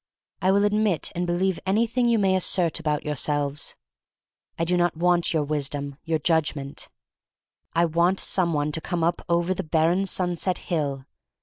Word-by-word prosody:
I 185 Hz, -, +2 dB
will 200 Hz, +1 st, +4 dB
admit 205 Hz, -5 st, +1 dB
and 175 Hz, +1 st, -2 dB
believe 180 Hz, +1 st, 0 dB
anything 230 Hz, +5 st, +1 dB
you 235 Hz, -1 st, +3 dB
may 190 Hz, -2 st, +2 dB
assert 175 Hz, -2 st, +1 dB
about 150 Hz, -2 st, -1 dB
your 150 Hz, -1 st, -2 dB
selves. 145 Hz, +1 st, -2 dB, 0.8 s
I 165 Hz, -, 0 dB
do 180 Hz, +1 st, +1 dB
not 175 Hz, -2 st, +1 dB
want 175 Hz, 0 st, +2 dB
your 155 Hz, -3 st, +1 dB
wisdom, 145 Hz, -1 st, -3 dB
your 165 Hz, -1 st, 0 dB
judgment. 155 Hz, -3 st, -1 dB, 0.8 s
I 170 Hz, +1 st, +3 dB
want 170 Hz, +3 st, +2 dB
some 180 Hz, -3 st, +1 dB
one 150 Hz, -1 st, 0 dB
to 160 Hz, -, -1 dB
come 175 Hz, -1 st, -2 dB
up 170 Hz, +1 st, +1 dB
over 170 Hz, +2 st, +2 dB
the 185 Hz, -, -3 dB
barren 170 Hz, +3 st, +1 dB
sunset 180 Hz, 0 st, 0 dB
hill. 140 Hz, -5 st, -3 dB
170 Hz, 170 wpm, -25 LUFS, 150-185 Hz, 0.8 s, will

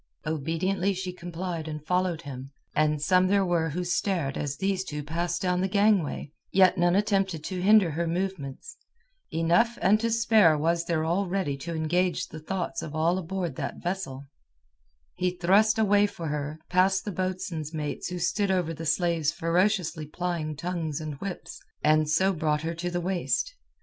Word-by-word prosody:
Obediently 165 Hz, +6 st, 0 dB
she 185 Hz, 0 st, -4 dB
complied 175 Hz, -2 st, -5 dB
and 150 Hz, -1 st, -6 dB
followed 180 Hz, -2 st, 0 dB
him, 135 Hz, -1 st, -7 dB, 0.2 s
and 150 Hz, 0 st, +2 dB
some 185 Hz, +4 st, +3 dB
there 195 Hz, 0 st, +3 dB
were 170 Hz, -2 st, +1 dB
who 175 Hz, +5 st, -3 dB
stared 175 Hz, -5 st, -1 dB
as 145 Hz, -1 st, -3 dB
these 195 Hz, -1 st, 0 dB
two 150 Hz, -4 st, -5 dB
passed 170 Hz, +3 st, -2 dB
down 180 Hz, -1 st, +1 dB
the 190 Hz, -, +1 dB
gangway, 200 Hz, -7 st, +1 dB, 0.2 s
yet 190 Hz, -1 st, +5 dB
none 175 Hz, -1 st, +3 dB
attempted 195 Hz, -5 st, +1 dB
to 185 Hz, +2 st, -4 dB
hinder 200 Hz, -3 st, +5 dB
her 170 Hz, +3 st, -1 dB
movements. 185 Hz, -, -4 dB, 0.5 s
Enough 175 Hz, +9 st, +2 dB
and 210 Hz, +2 st, +4 dB
to 230 Hz, +1 st, 0 dB
spare 220 Hz, -8 st, +4 dB
was 165 Hz, +2 st, +1 dB
there 160 Hz, -2 st, 0 dB
already 180 Hz, -3 st, 0 dB
to 165 Hz, +4 st, -5 dB
engage 175 Hz, +2 st, 0 dB
the 155 Hz, -, -8 dB
thoughts 180 Hz, +3 st, -3 dB
of 155 Hz, -1 st, -7 dB
all 170 Hz, +4 st, +2 dB
aboard 180 Hz, -4 st, -4 dB
that -, -, -4 dB
vessel. 175 Hz, -7 st, -4 dB, 0.9 s
He 180 Hz, -, 0 dB
thrust 205 Hz, +5 st, +4 dB
a 220 Hz, -, +3 dB
way 205 Hz, 0 st, +4 dB
for 175 Hz, -6 st, -6 dB
her, 150 Hz, +1 st, -3 dB
past 190 Hz, +2 st, +2 dB
the 205 Hz, -, -2 dB
boatswain's 185 Hz, -4 st, -3 dB
mates 150 Hz, -2 st, -3 dB
who 180 Hz, -, -4 dB
stood 195 Hz, +4 st, 0 dB
over 180 Hz, -3 st, +1 dB
the 165 Hz, 0 st, -6 dB
slaves 165 Hz, -2 st, +1 dB
ferociously 170 Hz, -1 st, 0 dB
plying 165 Hz, -1 st, -3 dB
tongues 160 Hz, -1 st, -3 dB
and 155 Hz, -1 st, -5 dB
whips, 195 Hz, -2 st, -6 dB, 0.2 s
and 155 Hz, 0 st, +3 dB
so 190 Hz, +5 st, +3 dB
brought 155 Hz, -2 st, 0 dB
her 165 Hz, +1 st, -2 dB
to 170 Hz, +2 st, -3 dB
the 175 Hz, 0 st, -2 dB
waist. 190 Hz, -, -1 dB
175 Hz, 175 wpm, -27 LUFS, 155-190 Hz, 0.9 s, yet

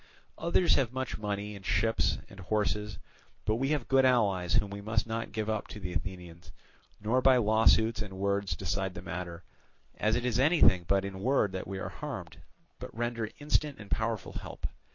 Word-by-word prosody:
Others 170 Hz, +1 st, +3 dB
have 130 Hz, -4 st, +1 dB
much 130 Hz, -3 st, -3 dB
money 105 Hz, 0 st, -3 dB
and 100 Hz, -, -11 dB
ships 110 Hz, +4 st, +1 dB
and 100 Hz, -, -14 dB
horses, 105 Hz, 0 st, -1 dB, 0.5 s
but 110 Hz, +1 st, +1 dB
we 135 Hz, +3 st, 0 dB
have 145 Hz, -4 st, 0 dB
good 135 Hz, 0 st, +4 dB
allies 100 Hz, -9 st, +3 dB
whom 100 Hz, -, +2 dB
we 100 Hz, 0 st, -6 dB
must 110 Hz, +1 st, 0 dB
not 115 Hz, -1 st, -3 dB
give 110 Hz, -1 st, -2 dB
up 110 Hz, -1 st, -1 dB
to 105 Hz, -, -8 dB
the 90 Hz, -3 st, -5 dB
Athenians, 85 Hz, -3 st, -6 dB, 0.5 s
nor 115 Hz, +5 st, +1 dB
by 130 Hz, 0 st, +6 dB
lawsuits 110 Hz, 0 st, +4 dB
and 95 Hz, -3 st, -6 dB
words 100 Hz, 0 st, 0 dB
decide 95 Hz, +1 st, -2 dB
the -, -, -7 dB
matter, 90 Hz, -1 st, -5 dB, 0.6 s
as 110 Hz, +1 st, +2 dB
it 120 Hz, 0 st, -1 dB
is 125 Hz, -1 st, +1 dB
anything 130 Hz, -, +5 dB
but 100 Hz, 0 st, +2 dB
in 95 Hz, -1 st, -6 dB
word 110 Hz, -2 st, +2 dB
that 95 Hz, -1 st, -5 dB
we 95 Hz, 0 st, -4 dB
are -, -, -4 dB
harmed, -, -, -7 dB, 0.4 s
but -, -, -6 dB
render 115 Hz, -2 st, -2 dB
instant 150 Hz, -1 st, 0 dB
and 105 Hz, -2 st, -12 dB
powerful 110 Hz, -2 st, -1 dB
help. -, -, -7 dB
105 Hz, 190 wpm, -30 LUFS, 95-120 Hz, 0.6 s, by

